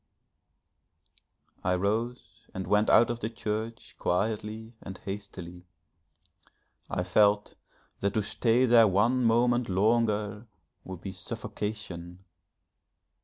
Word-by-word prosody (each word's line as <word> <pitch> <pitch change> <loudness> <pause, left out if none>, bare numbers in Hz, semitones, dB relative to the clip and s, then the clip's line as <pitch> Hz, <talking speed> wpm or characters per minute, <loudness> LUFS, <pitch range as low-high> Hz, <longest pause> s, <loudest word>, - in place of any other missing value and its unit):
I 90 0 +2
rose 110 +6 -3
and 95 0 -3
went 105 +4 +2
out 120 - +6
of 120 - -4
the 110 - -2
church 110 0 -4
quietly 110 +4 -2
and 95 -1 -8
hastily; 90 -3 -8 1.2
I 90 - -1
felt 105 +3 +3 0.5
that 100 0 -1
to 110 - +2
stay 115 +4 +2
there 115 -2 +7
one 115 +7 +2
moment 120 +1 +3
longer 105 +1 +1 0.4
would 95 -2 -8
be 95 - -5
suffocation.... 95 -4 -6
105 Hz, 105 wpm, -29 LUFS, 95-115 Hz, 1.2 s, there